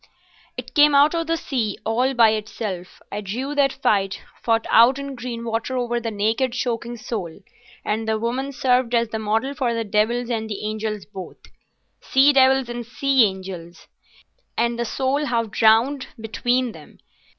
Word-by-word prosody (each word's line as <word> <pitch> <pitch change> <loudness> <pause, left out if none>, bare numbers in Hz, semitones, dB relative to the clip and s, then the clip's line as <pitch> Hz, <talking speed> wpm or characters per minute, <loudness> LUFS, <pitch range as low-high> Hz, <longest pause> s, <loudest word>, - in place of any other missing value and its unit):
It - - -7
came 295 -1 +5
out 290 +3 +5
of 330 -1 -1
the 330 0 +1
sea—all 245 -1 -1
by 230 -2 +6
itself. 210 -4 -5
I 205 - -4
drew 245 +8 -4
that 280 -2 +3
fight, 200 -8 0 0.2
fought 225 -1 +1
out 235 +4 +6
in 280 0 -5
green 240 -2 -6
water 230 +3 -2
over 240 -1 -1
the 230 -1 -3
naked, 225 +4 0
choking 240 -1 -3
soul, 200 -7 -6 0.4
and 220 +1 -1
the 220 0 +1
woman 250 +5 -2
served 250 -2 +1
as 235 -1 +1
the 220 - -3
model 220 +6 -1
for 255 -5 -1
the 230 - -1
devils 225 +4 0
and 220 -1 -2
the 205 -1 -5
angels 215 -1 -3
both—sea 265 +7 -2
devils 265 -1 +4
and 240 0 -5
sea 265 +1 +3
angels, 185 -3 -6 0.7
and 235 0 0
the 235 - 0
soul 270 +5 -1
half 230 -5 -1
drowned 230 +6 +3
between 245 +3 0
them. - - -15
235 Hz, 160 wpm, -22 LUFS, 220-260 Hz, 0.7 s, by